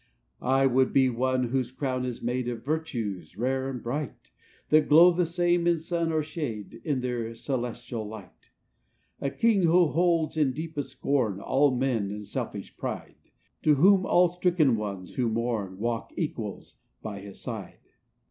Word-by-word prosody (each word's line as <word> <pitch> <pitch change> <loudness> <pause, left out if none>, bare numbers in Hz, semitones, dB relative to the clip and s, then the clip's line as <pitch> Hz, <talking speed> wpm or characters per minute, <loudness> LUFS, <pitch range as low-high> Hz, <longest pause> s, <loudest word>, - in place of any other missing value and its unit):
"I 135 +1 +3
would 130 0 +3
be 130 -2 +4
one 125 +1 0
whose 130 -1 0
crown 130 -1 -2
is 125 -2 -5
made 125 +1 -1
Of 120 -1 -5
virtues, 120 - -3
rare 130 +3 0
and 125 -3 -6
bright; 135 +1 -5 0.4
That 155 0 +4
glow 165 +4 +8
the 175 0 +1
same 175 0 +1
in 170 -1 +4
sun 165 0 -1
or 155 -1 +1
shade, 140 - -5
In 145 -5 -1
their 120 -2 -3
celestial 120 -2 -4
light. 105 -4 -12 0.7
v - - -1
"A - - +1
king, 205 +9 +2
who 170 -1 +5
holds 165 -1 +1
in 145 -4 +2
deepest 150 -2 -5
scorn 120 -11 0
All 135 +7 +3
mean 120 -6 0
and 105 +1 -6
selfish - - -5
pride; - - -6 0.3
To 150 -1 +4
whom 190 +5 +5
all 175 0 +5
stricken 175 -7 +2
ones 100 -4 -5
who 125 -3 0
mourn, 110 -4 -2
Walk 115 +2 -2
equals - - -5 0.2
by 105 -2 -5
his 100 0 -10
side. - - -6
130 Hz, 165 wpm, -27 LUFS, 115-160 Hz, 0.7 s, glow